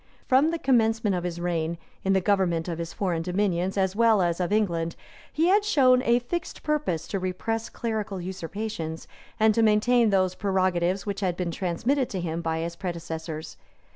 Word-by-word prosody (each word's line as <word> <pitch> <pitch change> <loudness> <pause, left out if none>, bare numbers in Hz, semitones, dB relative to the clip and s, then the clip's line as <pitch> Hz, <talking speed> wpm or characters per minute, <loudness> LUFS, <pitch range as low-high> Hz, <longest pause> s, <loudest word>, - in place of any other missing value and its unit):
From 270 +5 +4
the 335 - -1
commencement 225 - +2
of 175 - -2
his 175 -1 -4
reign, 170 -1 -1 0.3
in 195 - +2
the 190 - +3
government 185 -4 +1
of 170 -1 -4
his 165 0 -4
foreign 175 -4 -1
dominions, 185 +1 0
as 190 0 +1
well 225 -3 +4
as 170 0 0
of 180 0 -1
England, 170 -6 0 0.4
he 325 +3 +2
had 405 +2 +4
shown 260 -11 +4
a 235 -2 +3
fixed 315 +8 -4
purpose 275 - -1
to 195 - -1
repress 205 +5 -3
clerical 220 -4 -3
usurpations, 180 -1 -5 0.3
and 220 0 +5
to 230 - +2
maintain 225 +2 +4
those 185 -2 +2
prerogatives 185 -2 0
which 200 -1 -3
had 180 -3 -1
been 180 -2 -2
transmitted 230 - 0
to 190 - -3
him 170 -1 -3
by 160 -1 -1
his 170 +1 -4
predecessors. 165 -3 -5
190 Hz, 180 wpm, -26 LUFS, 170-225 Hz, 0.4 s, and